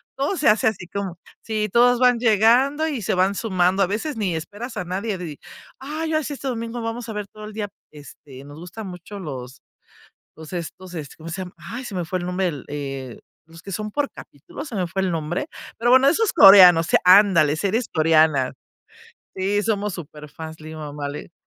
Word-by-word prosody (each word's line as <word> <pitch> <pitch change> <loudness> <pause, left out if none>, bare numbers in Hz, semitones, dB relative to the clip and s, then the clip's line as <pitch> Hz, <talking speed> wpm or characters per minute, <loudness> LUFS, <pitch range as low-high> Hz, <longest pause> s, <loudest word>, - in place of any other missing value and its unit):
todo 285 +8 -1
se 290 - +4
hace 215 +1 +3
así 185 -5 -2
como 190 -2 -5 0.2
sí 215 -2 -2
todos 245 +2 +5
van 250 -2 +4
llegando 245 +7 +3
y 275 -7 -3
se 190 - -1
van 190 +2 +2
sumando. 185 -2 +1
A - - +1
veces, 225 +9 -3
ni 190 -6 -1
esperas 205 +10 -7
a - - -2
nadie 195 +3 -3
di 160 -5 -7 0.4
ay, 310 +4 -4
ya 310 -1 +1
sí, 290 - -4
este 275 0 -6
domingo 230 0 -4
vamos 230 +1 -5
a - - -4
ver 210 -1 -5
todo 215 +1 -11
el 215 - -9
día, 210 -2 -4 0.2
este, 140 -2 -13
nos 145 +2 -11
gusta 180 +6 -8
mucho 185 +2 -9
los 130 -6 -8 0.7
los 160 +2 -11
estos 180 +1 -7
este, 150 -3 -7
¿cómo 165 +1 -9
se 190 +3 -5
llama? 180 - -11
Ay, 250 +2 -8
se 200 - -7
me 175 -2 -2
fue 185 +2 -2
el 175 - -5
nombre, 180 -1 0 0.2
eh, 135 -4 -6 0.3
los 165 0 -14
que 195 - -8
son 215 +2 -4
por 290 +2 -1
capítulo, - - -10
se 240 - -7
me 185 -2 0
fue 190 +3 -2
el 185 - 0
nombre. 165 - -3 0.3
Pero 240 +1 +2
bueno, 260 +1 +6
esos 435 +8 +2
coreanos, 180 -4 +9
se - - +4
Ándale, 180 -6 +6
series 210 +7 -1
coreanas. 155 -4 +3 0.8
Sí, 200 +2 0
somos 210 -3 -1
súperfans. 160 0 -9
Mi 155 0 -9
mamá 145 -2 -6
le 150 +4 -8
190 Hz, 205 wpm, -22 LUFS, 160-225 Hz, 0.8 s, coreanos